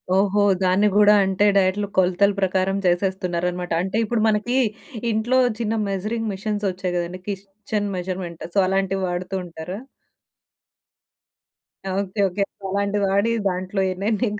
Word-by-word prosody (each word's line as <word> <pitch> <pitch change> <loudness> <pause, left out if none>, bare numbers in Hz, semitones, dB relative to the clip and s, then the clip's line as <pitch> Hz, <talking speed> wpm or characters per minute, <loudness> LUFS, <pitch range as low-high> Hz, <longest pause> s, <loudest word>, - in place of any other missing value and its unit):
ఓహో! 205 +1 +3 0.2
దాన్ని 190 +3 +3
గూడా 210 0 +7
అంటే 195 +2 +1
డైట్‌లు 195 +2 +2
కొలతల 190 +2 +4
ప్రకారం 190 0 +1
చేసేస్తున్నారనమాట. 180 -1 0
అంటే 190 +3 -2
ఇప్పుడు 225 +1 0
మనకీ 220 +4 +1 0.5
ఇంట్లో 235 +4 +2 0.2
చిన్న 225 -1 -1 0.2
మెజరింగ్ 215 +3 -2
మిషన్స్ 205 +1 -3
వచ్చాయి 185 -1 -3
కదండీ 175 +1 -4
కిస్‌చెన్ 200 +1 -4
మెజర్‌మెంట్. 180 -2 -5
సో, - - 0
అలాంటివి 195 0 0
వాడుతూ 180 +2 -3
ఉంటారా? 175 +4 -7 2.2
ఓకే. 200 +1 -4
ఓకే. 190 +2 -1 0.3
అలాంటిది 200 +1 0
వాడీ 200 +4 +2 0.2
దాంట్లో 185 +1 -2
ఎన్నెన్ని 210 +5 0
195 Hz, 120 wpm, -22 LUFS, 185-205 Hz, 2.2 s, గూడా